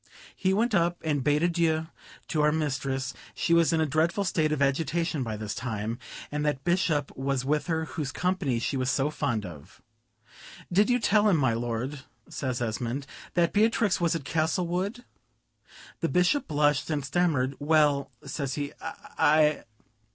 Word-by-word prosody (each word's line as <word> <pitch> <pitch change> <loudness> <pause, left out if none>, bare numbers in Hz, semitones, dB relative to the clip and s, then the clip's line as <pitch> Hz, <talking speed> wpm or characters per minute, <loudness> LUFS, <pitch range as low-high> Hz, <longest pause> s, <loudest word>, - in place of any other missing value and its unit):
We 190 - +4
went 225 +4 +1
up 175 -2 +2
and 145 -4 0
bade 150 +3 +2
adieu 165 -2 +1 0.4
to 155 - +1
our 150 0 +4
mistress; 135 -3 -2 0.2
she 170 - +1
was 170 0 +4
in 165 - +2
a 160 - +3
dreadful 160 +7 +1
state 160 -5 +1
of 150 - 0
agitation 155 +3 0
by 110 -4 -3
this 105 -2 -4
time, 115 -1 -3 0.3
and 150 0 -2
that 145 -2 -1
Bishop 175 -5 +1
was 135 -1 -1
with 150 +4 0
her 160 -2 0
whose 150 -4 -4
company 180 -7 0
she 125 +4 -1
was 130 0 0
so 135 +3 +1
fond 120 -9 -1
of. 80 -5 -11 0.9
"Did 205 +6 +4
you 245 - +4
tell 215 -2 +3
him, 180 - +4
my 130 -5 +2
lord," 120 +4 -3 0.3
says 130 -3 -3
Esmond, 120 +4 -3 0.3
"that 170 -1 +2
Beatrix 210 -2 +2
was 170 -1 +2
at 150 -5 -4
Castlewood?" 180 - -1 0.9
The 165 - 0
Bishop 180 +11 +2
blushed 145 -1 +1
and 145 -3 -1
stammered: 145 -4 +1
"Well," 145 -2 +3 0.2
says 140 -3 -3
he, 145 0 -4
"I 150 0 +1
150 Hz, 165 wpm, -27 LUFS, 135-170 Hz, 0.9 s, We